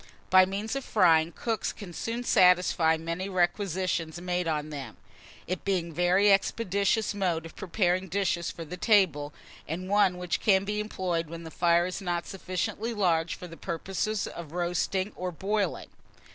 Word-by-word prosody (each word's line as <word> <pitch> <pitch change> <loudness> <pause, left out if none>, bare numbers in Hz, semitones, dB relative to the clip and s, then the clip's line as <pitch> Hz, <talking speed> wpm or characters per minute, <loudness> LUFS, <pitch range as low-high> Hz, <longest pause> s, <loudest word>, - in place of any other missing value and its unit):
By 185 0 +7
means 205 +5 -3
of 275 - -3
frying, 165 -7 +4
cooks 225 +4 -2
can 190 -5 -10
soon 230 +7 -3
satisfy 180 -6 +4
many 170 +4 -4
requisitions 180 -2 -1
made 180 -1 -2
on 155 -1 -2
them, 140 -3 -7 0.5
it 185 0 -4
being 180 -4 -1
a - - -12
very 185 +4 +4
expeditious 200 +1 +1
mode 175 -5 -1
of 165 - -11
preparing 185 0 0
dishes 175 -2 0
for 165 - -7
the 180 +4 -7
table, 175 - +3 0.4
and 175 +4 -4
one 200 -2 +3
which 180 -1 -2
can 195 -2 +3
be 210 +1 -2
employed 180 -6 -2
when 170 0 -7
the 160 - -9
fire 170 0 +3
is 185 +2 -4
not 175 -2 -2
sufficiently 205 +5 -3
large 170 -5 +1
for 180 - -9
the 165 - -10
purposes 195 +4 -2
of 165 -2 -8
roasting 180 +3 -1
and 180 -3 -5
boiling. 205 +1 -1
180 Hz, 165 wpm, -28 LUFS, 170-200 Hz, 0.5 s, By